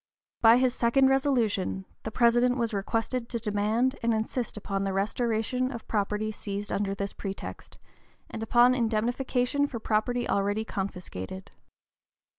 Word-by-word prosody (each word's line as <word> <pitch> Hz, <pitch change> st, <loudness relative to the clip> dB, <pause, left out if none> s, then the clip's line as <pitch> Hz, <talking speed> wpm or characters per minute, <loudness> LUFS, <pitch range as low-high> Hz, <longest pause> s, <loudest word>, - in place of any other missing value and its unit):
By 230 Hz, +1 st, +8 dB
his 255 Hz, -1 st, +2 dB
second 265 Hz, +2 st, +3 dB
resolution, 235 Hz, -9 st, +1 dB, 0.2 s
the -, -, -4 dB
President 240 Hz, +2 st, +3 dB
was 230 Hz, -2 st, -1 dB
requested 225 Hz, +4 st, -2 dB
to 235 Hz, -, -2 dB
demand 220 Hz, +4 st, 0 dB
and 230 Hz, -1 st, +2 dB
insist 220 Hz, +1 st, -3 dB
upon 195 Hz, -1 st, -2 dB
the 195 Hz, -1 st, -1 dB
restoration 230 Hz, +5 st, 0 dB
of 235 Hz, -4 st, -8 dB
property 210 Hz, 0 st, -1 dB
seized 205 Hz, -1 st, -5 dB
under 195 Hz, 0 st, -1 dB
this 200 Hz, 0 st, -4 dB
pretext, 195 Hz, -1 st, -7 dB, 0.5 s
and 225 Hz, -, -7 dB
upon 240 Hz, +3 st, +5 dB
indemnification 245 Hz, +4 st, 0 dB
for 255 Hz, -, -5 dB
property 225 Hz, +3 st, 0 dB
already 205 Hz, +2 st, 0 dB
confiscated. 190 Hz, -, -6 dB
225 Hz, 135 wpm, -28 LUFS, 205-245 Hz, 0.5 s, By